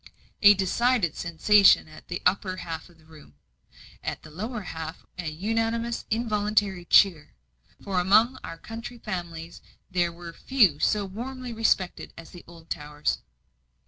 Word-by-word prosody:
A 205 Hz, 0 st, +8 dB
decided 195 Hz, -1 st, +1 dB
sensation 190 Hz, +3 st, +4 dB
at 155 Hz, -, -14 dB
the 175 Hz, -, -5 dB
upper 185 Hz, 0 st, +1 dB
half 165 Hz, -1 st, -6 dB
of 170 Hz, -, -21 dB
the 160 Hz, -, -23 dB
room. 155 Hz, -, -17 dB, 0.7 s
At -, -, -4 dB
the 155 Hz, -, -13 dB
lower 215 Hz, +8 st, -5 dB
half 160 Hz, -2 st, -7 dB
an 175 Hz, -4 st, -4 dB
unanimous, 225 Hz, +4 st, -1 dB
involuntary 210 Hz, -4 st, 0 dB
cheer; 170 Hz, -, +4 dB, 0.5 s
for 190 Hz, -2 st, 0 dB
among 215 Hz, +8 st, +4 dB
our 165 Hz, -, -7 dB
county 230 Hz, +5 st, -8 dB
families 170 Hz, -6 st, -6 dB, 0.3 s
there 175 Hz, -2 st, +1 dB
were 170 Hz, 0 st, -10 dB
few 205 Hz, -, +3 dB
so 210 Hz, +3 st, +1 dB
warmly 245 Hz, +5 st, -6 dB
respected 220 Hz, -5 st, 0 dB
as 165 Hz, -, -11 dB
the 175 Hz, -, -12 dB
Oldtowers. 150 Hz, -, -4 dB
185 Hz, 140 wpm, -26 LUFS, 165-220 Hz, 0.7 s, A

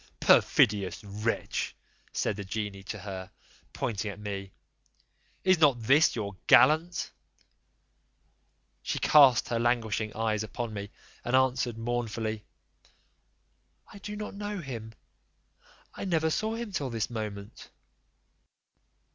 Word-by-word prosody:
"Perfidious 100 Hz, -1 st, +3 dB
wretch!" 105 Hz, +3 st, -3 dB, 0.4 s
said 105 Hz, -, -1 dB
the 100 Hz, -, -5 dB
genie 100 Hz, 0 st, -4 dB
to 95 Hz, -, -6 dB
her, 95 Hz, -2 st, -7 dB, 0.4 s
pointing 110 Hz, -6 st, -3 dB
at 100 Hz, 0 st, -8 dB
me, 100 Hz, -2 st, -5 dB, 0.9 s
"is 185 Hz, -2 st, +4 dB
not 145 Hz, -6 st, +5 dB
this 140 Hz, +7 st, +4 dB
your 105 Hz, -4 st, -4 dB
gallant?" 165 Hz, +3 st, +4 dB, 1.7 s
She -, -, -3 dB
cast 140 Hz, -5 st, +6 dB
her 115 Hz, -, 0 dB
languishing 115 Hz, -2 st, 0 dB
eyes 110 Hz, -2 st, 0 dB
upon 110 Hz, +1 st, -5 dB
me, 100 Hz, 0 st, -5 dB, 0.3 s
and 120 Hz, -, 0 dB
answered 130 Hz, -3 st, +2 dB
mournfully, 115 Hz, -2 st, -3 dB, 1.5 s
"I 200 Hz, -, -11 dB
do 210 Hz, +1 st, -6 dB
not 210 Hz, 0 st, -6 dB
know 205 Hz, +1 st, -5 dB
him, 120 Hz, -, -7 dB, 1.0 s
I -, -, -6 dB
never 160 Hz, -3 st, +1 dB
saw 220 Hz, +6 st, -1 dB
him 230 Hz, -2 st, -5 dB
till 145 Hz, -8 st, -2 dB
this 115 Hz, 0 st, -3 dB
moment." 105 Hz, -2 st, -6 dB
115 Hz, 115 wpm, -29 LUFS, 105-145 Hz, 1.7 s, cast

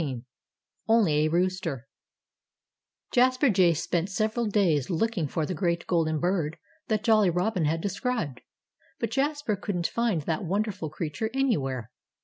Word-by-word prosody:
XVII 130 Hz, -6 st, -4 dB, 0.6 s
ONLY 185 Hz, -10 st, +4 dB
A -, -, +3 dB
ROOSTER 170 Hz, -6 st, -1 dB, 1.2 s
Jasper 255 Hz, +1 st, +4 dB
Jay 185 Hz, -3 st, +4 dB
spent 170 Hz, +3 st, -1 dB
several 220 Hz, +3 st, 0 dB
days 175 Hz, -, +2 dB
looking 185 Hz, -1 st, 0 dB
for 155 Hz, +3 st, -2 dB
the 185 Hz, -, -3 dB
great 170 Hz, 0 st, -1 dB
golden 160 Hz, -3 st, +1 dB
bird 170 Hz, -3 st, 0 dB, 0.3 s
that 215 Hz, -1 st, 0 dB
Jolly 215 Hz, -4 st, +4 dB
Robin 180 Hz, 0 st, 0 dB
had 160 Hz, +2 st, 0 dB
described. 200 Hz, -, -2 dB, 0.6 s
But 230 Hz, -, -2 dB
Jasper 285 Hz, -3 st, 0 dB
couldn't 185 Hz, -3 st, -3 dB
find 225 Hz, -9 st, 0 dB
the 160 Hz, +1 st, -1 dB
wonderful 195 Hz, -2 st, -2 dB
creature 160 Hz, +7 st, -3 dB
anywhere. 135 Hz, -, 0 dB
185 Hz, 135 wpm, -27 LUFS, 160-220 Hz, 1.2 s, ONLY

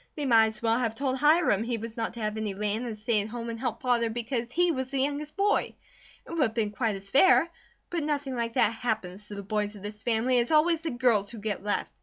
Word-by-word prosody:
They 295 Hz, -, -3 dB
might 225 Hz, -4 st, +5 dB
as 220 Hz, +1 st, -7 dB
well 230 Hz, +1 st, +2 dB
have 230 Hz, -3 st, -1 dB
told 265 Hz, +1 st, -1 dB
Hiram 300 Hz, -, +4 dB
he 235 Hz, +1 st, -2 dB
was 225 Hz, +1 st, -7 dB
not 230 Hz, -1 st, -3 dB
to 235 Hz, -, -7 dB
have 215 Hz, 0 st, -2 dB
any 215 Hz, -3 st, -3 dB
land 210 Hz, +4 st, -2 dB
and 220 Hz, -2 st, -5 dB
stay 215 Hz, 0 st, +1 dB
at 205 Hz, -, -5 dB
home 230 Hz, +1 st, -5 dB
and 230 Hz, -, -6 dB
help 240 Hz, -2 st, -3 dB
Father 240 Hz, -2 st, +2 dB
because 235 Hz, +1 st, -3 dB
he 350 Hz, +4 st, +2 dB
was 260 Hz, -4 st, -3 dB
the 275 Hz, -, -3 dB
youngest 290 Hz, +2 st, -2 dB
boy; 405 Hz, +1 st, +1 dB, 0.5 s
it -, -, -11 dB
would 335 Hz, -2 st, -1 dB
have 225 Hz, -5 st, +2 dB
been 215 Hz, -3 st, 0 dB
quite 220 Hz, -1 st, -1 dB
as 195 Hz, 0 st, -9 dB
fair; 335 Hz, +3 st, +6 dB, 0.4 s
but 345 Hz, -2 st, -1 dB
nothing 285 Hz, -3 st, -2 dB
like 230 Hz, -1 st, -2 dB
that 220 Hz, -, +3 dB
happens 210 Hz, -4 st, -3 dB
to 205 Hz, -, -8 dB
the 200 Hz, -, -6 dB
boys 210 Hz, +1 st, -2 dB
of 200 Hz, -, -12 dB
this 210 Hz, 0 st, -5 dB
family, 240 Hz, +2 st, +2 dB
it -, -, +4 dB
is 235 Hz, -, -2 dB
always 320 Hz, +1 st, +3 dB
the 325 Hz, -, -3 dB
girls 240 Hz, -6 st, +2 dB
who 235 Hz, -, -8 dB
get 205 Hz, -2 st, -4 dB
left. 205 Hz, 0 st, -1 dB
230 Hz, 265 wpm, -28 LUFS, 215-265 Hz, 0.5 s, fair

